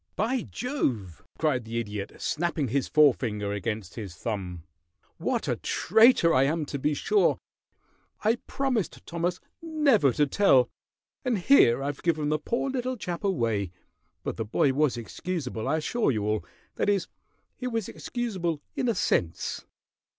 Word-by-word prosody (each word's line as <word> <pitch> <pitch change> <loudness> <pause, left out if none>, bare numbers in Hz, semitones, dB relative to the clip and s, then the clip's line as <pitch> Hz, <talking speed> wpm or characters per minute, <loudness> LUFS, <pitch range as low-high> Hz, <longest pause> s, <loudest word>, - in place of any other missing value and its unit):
"By 240 +5 0
jove!" 120 - -2 0.2
cried 145 -6 +1
the 115 +1 -5
Idiot, 105 -3 -4
snapping 155 -4 -1
his 135 +3 0
forefinger 115 -9 +3
against 105 -2 -3
his 100 -7 -7
thumb, 90 -5 -4 0.5
"what - - -1
a - - 0
traitor 220 -4 +4
I 130 - +5
am, 155 +2 0
to 140 - -4
be 150 +2 +1
sure. 415 - +2 0.9
I 220 +3 +3
promised 250 - -1
Thomas 170 +1 -2 0.2
never 295 - +3
to 150 - +3
tell, 135 -6 +4 0.5
and 250 -4 +1
here 175 - +5
I've 140 0 -3
given 155 -3 +1
the 155 0 +1
poor 235 - -1
little 255 -1 -2
chap 175 -4 -5
away; 115 - 0 0.5
but - - -4
the 115 - -1
boy 135 +5 +2
was 145 -3 +2
excusable, 130 -1 -4
I 155 +4 +2
assure 230 +9 0
you 110 -6 0
all 105 0 -1 0.3
that - - +1
is, 200 -4 +1 0.5
he 250 - -4
was 225 -4 -2
excusable 185 -10 -3 0.2
in 250 - 0
a 230 - +1
sense. 85 - -1
155 Hz, 150 wpm, -27 LUFS, -, 0.9 s, I